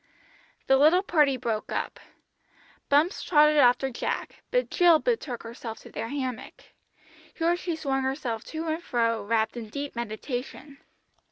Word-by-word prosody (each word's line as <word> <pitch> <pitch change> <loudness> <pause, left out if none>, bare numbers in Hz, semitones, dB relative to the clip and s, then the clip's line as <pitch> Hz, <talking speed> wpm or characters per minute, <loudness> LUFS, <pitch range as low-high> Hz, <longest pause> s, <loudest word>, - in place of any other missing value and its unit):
The 270 - +4
little 320 +7 +5
party 295 -8 +3
broke 230 -3 -3
up. - - -3 0.9
Bumps 300 +7 +3
trotted 300 -2 +4
after 260 0 +4
Jack, 235 - -4
but - - 0
Jill 345 -3 +6
betook 310 - -2
herself 230 -1 -7
to - - -13
their - - -4
hammock. 260 -3 -5 0.7
Here 335 +1 +2
she 350 -1 -3
swung 275 -4 -1
herself 260 -4 -3
to 320 +1 -5
and 320 +1 -2
fro 230 -7 0
wrapped 220 +2 0
in 225 -2 -7
deep 280 +3 -5
meditation. 245 +5 -6
270 Hz, 145 wpm, -27 LUFS, 235-315 Hz, 0.9 s, Jill